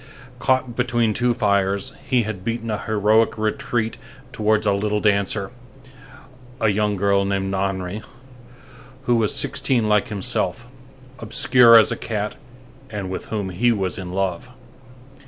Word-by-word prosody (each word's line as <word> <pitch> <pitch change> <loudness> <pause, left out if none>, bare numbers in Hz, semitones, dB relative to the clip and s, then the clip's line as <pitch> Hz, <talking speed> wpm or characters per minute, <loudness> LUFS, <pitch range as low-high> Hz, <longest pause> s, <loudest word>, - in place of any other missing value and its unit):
Caught 130 -2 0
between 120 -3 +1
two 125 +2 +1
fires, 100 -3 0
he 125 -3 +1
had 105 -4 -6
beaten 115 +1 -3
a 105 - -2
heroic 110 +1 +2
retreat 110 +1 -2 0.3
towards 110 0 +1
a 100 - +3
little 105 +1 0
dancer, 100 -1 0 1.1
a 110 - +2
young 105 0 +1
girl 100 0 +2
named 95 -1 -1
Nahenry, 95 +1 -2 1.0
who 120 - +2
was 110 -3 +2
sixteen 135 -5 +1
like 105 -1 +2
himself, 100 +1 -2 0.5
obscure 120 +1 +5
as 110 - +5
a - - 0
cat, 105 -2 -3 0.5
and 100 -4 -5
with - - -5
whom 105 -3 -3
he 120 +7 +2
was 95 -4 -2
in 90 -1 -6
love. 95 +4 -2
105 Hz, 140 wpm, -22 LUFS, 100-115 Hz, 1.1 s, obscure